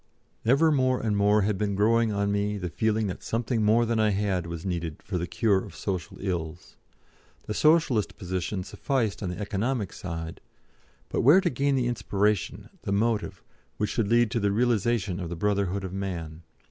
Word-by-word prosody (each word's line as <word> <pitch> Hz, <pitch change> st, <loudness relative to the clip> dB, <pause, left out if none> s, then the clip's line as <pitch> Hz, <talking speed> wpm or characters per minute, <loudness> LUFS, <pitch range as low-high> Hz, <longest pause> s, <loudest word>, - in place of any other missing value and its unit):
Ever 140 Hz, +7 st, +4 dB
more 130 Hz, -3 st, +2 dB
and 110 Hz, -2 st, 0 dB
more 105 Hz, +1 st, +3 dB
had 100 Hz, -1 st, 0 dB
been 100 Hz, -2 st, 0 dB
growing 115 Hz, +2 st, +3 dB
on 100 Hz, 0 st, 0 dB
me 100 Hz, +1 st, 0 dB
the 90 Hz, -3 st, -4 dB
feeling 110 Hz, +2 st, +1 dB
that 95 Hz, -, -4 dB
something 115 Hz, 0 st, -1 dB
more 110 Hz, +3 st, +4 dB
than 115 Hz, -1 st, 0 dB
I 110 Hz, -1 st, +4 dB
had 95 Hz, -4 st, 0 dB
was 85 Hz, +1 st, -6 dB
needed 85 Hz, -4 st, -4 dB
for 90 Hz, -2 st, -3 dB
the 85 Hz, -, -3 dB
cure 100 Hz, -3 st, +1 dB
of 95 Hz, -6 st, -11 dB
social 95 Hz, -4 st, -4 dB
ills. 85 Hz, -5 st, -4 dB, 0.7 s
The 105 Hz, -, -4 dB
Socialist 150 Hz, -7 st, +3 dB
position 95 Hz, +1 st, -3 dB
sufficed 110 Hz, -2 st, -2 dB
on 95 Hz, -, -2 dB
the 90 Hz, -, -5 dB
economic 105 Hz, +1 st, -2 dB
side, 80 Hz, -2 st, -6 dB, 0.7 s
but -, -, 0 dB
where 145 Hz, +10 st, +7 dB
to 185 Hz, -3 st, 0 dB
gain 140 Hz, +2 st, +1 dB
the 130 Hz, -2 st, +1 dB
inspiration, 105 Hz, -4 st, -1 dB
the -, -, -4 dB
motive, 105 Hz, -2 st, 0 dB, 0.3 s
which 105 Hz, -, -1 dB
should 115 Hz, -4 st, 0 dB
lead 120 Hz, 0 st, +3 dB
to 120 Hz, -, 0 dB
the 100 Hz, -1 st, +1 dB
realisation 110 Hz, -3 st, +1 dB
of 85 Hz, -3 st, -4 dB
the 85 Hz, -, -4 dB
Brotherhood 100 Hz, +1 st, 0 dB
of 95 Hz, -1 st, -5 dB
Man? 85 Hz, -5 st, -5 dB
105 Hz, 185 wpm, -27 LUFS, 95-115 Hz, 0.7 s, where